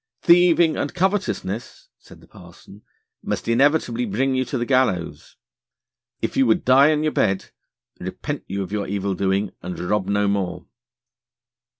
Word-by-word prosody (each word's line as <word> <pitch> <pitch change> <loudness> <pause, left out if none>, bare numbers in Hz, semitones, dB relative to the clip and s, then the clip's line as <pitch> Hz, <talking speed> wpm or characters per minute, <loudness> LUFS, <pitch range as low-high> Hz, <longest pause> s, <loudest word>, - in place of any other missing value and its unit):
'Thieving 170 -2 +5
and 145 - -3
covetousness,' 195 - -2
said - - -17
the - - -19
parson, - - -16 0.4
'must - - -4
inevitably 125 0 +2
bring 125 +5 0
you 130 0 +1
to 130 +1 -4
the 120 - -2
gallows. 125 -10 -1 0.9
If - - -2
you 135 - +3
would 110 - +1
die 130 +3 +6
in 155 0 +1
your 155 - +1
bed, 95 -8 0 0.5
repent - - -5
you 100 +1 -3
of 95 - -9
your 105 -1 -2
evildoing, 100 0 -1
and 90 +1 -6
rob 95 +1 -1
no 100 0 +1
more.' 90 -3 -2
115 Hz, 150 wpm, -22 LUFS, 100-145 Hz, 0.9 s, die